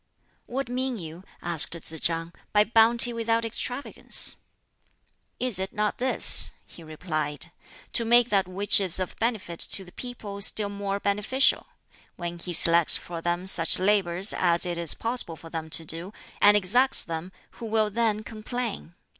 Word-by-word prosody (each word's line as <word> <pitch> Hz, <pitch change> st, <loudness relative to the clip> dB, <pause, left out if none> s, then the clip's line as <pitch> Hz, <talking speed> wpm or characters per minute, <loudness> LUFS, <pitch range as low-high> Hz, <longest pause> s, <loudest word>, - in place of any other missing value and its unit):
"What 270 Hz, +2 st, -4 dB
mean 255 Hz, 0 st, -3 dB
you," 165 Hz, -1 st, -9 dB, 0.2 s
asked 170 Hz, -1 st, +2 dB
Tsz 160 Hz, 0 st, -7 dB
chang, 165 Hz, 0 st, -2 dB, 0.2 s
"by 210 Hz, 0 st, +4 dB
bounty 230 Hz, +2 st, +4 dB
without 230 Hz, 0 st, -1 dB
extravagance?" 245 Hz, +4 st, +2 dB, 1.0 s
"Is 245 Hz, -7 st, +1 dB
it 190 Hz, 0 st, -5 dB
not 210 Hz, 0 st, -2 dB
this," 260 Hz, +1 st, +6 dB, 0.2 s
he -, -, -16 dB
replied 155 Hz, -1 st, -5 dB, 0.4 s
"to 235 Hz, -, +4 dB
make 240 Hz, +1 st, +3 dB
that 195 Hz, -3 st, +1 dB
which 195 Hz, +3 st, +3 dB
is 190 Hz, -2 st, +2 dB
of 185 Hz, -, -5 dB
benefit 220 Hz, -7 st, -3 dB
to 195 Hz, -, +3 dB
the 180 Hz, -, -15 dB
people 215 Hz, -5 st, -9 dB
still 205 Hz, 0 st, +3 dB
more 200 Hz, 0 st, -5 dB
beneficial? 210 Hz, +7 st, 0 dB, 0.5 s
When 175 Hz, -1 st, -7 dB
he 180 Hz, -, -7 dB
selects 170 Hz, -1 st, +4 dB
for 170 Hz, -1 st, -9 dB
them 175 Hz, +2 st, -3 dB
such 170 Hz, -3 st, +4 dB
labors 190 Hz, -1 st, 0 dB
as 175 Hz, -1 st, +1 dB
it 175 Hz, -1 st, -4 dB
is 170 Hz, -3 st, +1 dB
possible 230 Hz, -8 st, -3 dB
for 165 Hz, 0 st, -14 dB
them 160 Hz, -1 st, -6 dB
to 165 Hz, +1 st, 0 dB
do, 170 Hz, +6 st, -6 dB, 0.3 s
and 205 Hz, 0 st, +6 dB
exacts 245 Hz, +8 st, +3 dB
them, 165 Hz, +2 st, -7 dB, 0.3 s
who 230 Hz, -, -7 dB
will 215 Hz, -1 st, 0 dB
then 215 Hz, -1 st, -1 dB
complain? 220 Hz, -4 st, -6 dB
200 Hz, 160 wpm, -25 LUFS, 170-230 Hz, 1.0 s, this